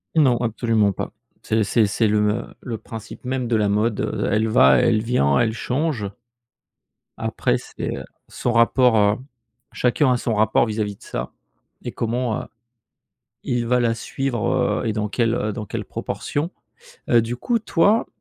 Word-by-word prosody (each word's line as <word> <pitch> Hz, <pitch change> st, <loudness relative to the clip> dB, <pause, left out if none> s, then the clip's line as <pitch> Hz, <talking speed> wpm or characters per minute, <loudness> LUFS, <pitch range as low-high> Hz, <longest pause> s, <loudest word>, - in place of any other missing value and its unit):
Non, 135 Hz, -6 st, +4 dB
absolument 115 Hz, -3 st, +1 dB
pas. -, -, -5 dB, 0.3 s
C'est 110 Hz, 0 st, +1 dB
c'est 110 Hz, +1 st, +2 dB
c'est 110 Hz, +3 st, +1 dB
le 105 Hz, 0 st, +2 dB
m 105 Hz, +1 st, -1 dB
le 115 Hz, -3 st, -4 dB
principe 110 Hz, +2 st, -10 dB
même 130 Hz, -1 st, -2 dB
de 115 Hz, -, +1 dB
la 105 Hz, -2 st, +2 dB
mode, 105 Hz, +2 st, +1 dB
heu, -, -, -1 dB
elle 110 Hz, +2 st, +2 dB
va, 65 Hz, -11 st, +6 dB
elle 110 Hz, -, +3 dB
vient, 70 Hz, -, +2 dB
elle 110 Hz, -1 st, +2 dB
change. 130 Hz, 0 st, -1 dB, 1.1 s
Après, -, -, 0 dB
c'est, -, -, -5 dB
heu, -, -, -6 dB, 0.2 s
son 120 Hz, -, -2 dB
rapport 115 Hz, -3 st, +4 dB, 0.5 s
chacun 130 Hz, +2 st, +2 dB
a -, -, +1 dB
son 120 Hz, -1 st, -2 dB
rapport 110 Hz, +2 st, +3 dB
vis-à-vis 105 Hz, -2 st, -2 dB
de -, -, -19 dB
ça -, -, -5 dB, 0.5 s
et -, -, -4 dB
comment, 120 Hz, 0 st, -1 dB
heu, -, -, -9 dB, 1.0 s
il 120 Hz, -1 st, -1 dB
va 125 Hz, +1 st, +3 dB
la 120 Hz, -1 st, +2 dB
suivre, 125 Hz, +1 st, -1 dB
heu -, -, -1 dB
et 110 Hz, -, 0 dB
dans 105 Hz, 0 st, -1 dB
quelle, 115 Hz, +1 st, +1 dB
heu, 105 Hz, -2 st, -1 dB
dans 105 Hz, +1 st, -5 dB
quelle -, -, -5 dB
proportion. 155 Hz, +5 st, -3 dB, 0.6 s
Heu, 120 Hz, -, +6 dB
du 115 Hz, +2 st, -4 dB
coup, 235 Hz, -, 0 dB
toi, 205 Hz, +1 st, +2 dB
115 Hz, 170 wpm, -22 LUFS, 105-125 Hz, 1.1 s, va